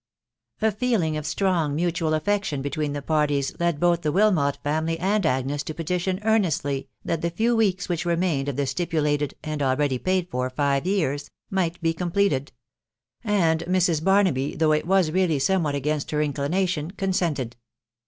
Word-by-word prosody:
A 220 - +4
feeling 210 -8 0
of 150 0 -4
strong 170 -7 0
mutual 165 -1 0
affection 155 -4 -1
between 145 0 -2
the 145 -1 -4
parties 145 -2 +1
led 170 -3 0
both 175 0 +2
the 150 - 0
Wilmot 180 -7 +2
family 160 +2 0
and 195 +4 +1
Agnes 135 +1 0
to 155 +1 -6
petition 180 +3 -1
earnestly 165 -11 0 0.2
that 165 - -1
the 170 - 0
few 225 +8 +1
weeks 195 -5 +1
which 170 -3 -1
remained 170 -5 0
of 140 - -3
the 140 +1 0
stipulated 150 -1 -1
(and 155 -1 -3
already 135 -1 +1
paid 185 +1 0
for) 125 0 -1
five 140 +3 0
years, 150 -7 0 0.2
might 180 -3 0
be 165 0 +2
completed; 170 -5 0 0.7
and 180 -7 +2
Mrs. 175 -4 +2
Barnaby, 185 -8 +2
though 155 -1 +2
it 155 +1 +1
was 190 -4 +3
really 175 -3 +2
somewhat 155 -1 +1
against 145 +1 -1
her 150 0 0
inclination, 150 +3 -1
consented. 175 - -1
160 Hz, 165 wpm, -24 LUFS, 145-185 Hz, 0.7 s, A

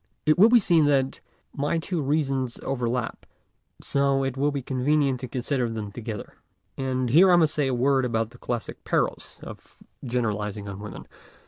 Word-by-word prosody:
It 155 +3 +3
will 215 +4 +8
be 245 - +7
seen 170 -7 +4
that 135 -2 +1 0.3
my 145 +4 -1
two 170 0 -2
reasons 135 -3 -1
over 125 -3 -1
lap, 120 -1 -3 0.6
so 140 -1 +1
it 135 -1 -2
will 140 +2 +1
be 140 -2 -4
convenient 135 +1 +1
to 130 - -6
consider 125 0 -1
them 110 -2 -5
together. 110 -1 -7 0.4
And 130 -2 -1
here 180 +7 +7
I - - +7
must 160 -3 +3
say 145 -3 0
a 130 - 0
word 135 +2 +2
about 115 -2 -1
the 120 - -16
classic 120 -2 -5
perils - - -1
of - - -11 0.3
generalizing 105 -5 -2
on 100 0 -7
women. 105 0 -9
130 Hz, 180 wpm, -25 LUFS, 120-145 Hz, 0.6 s, will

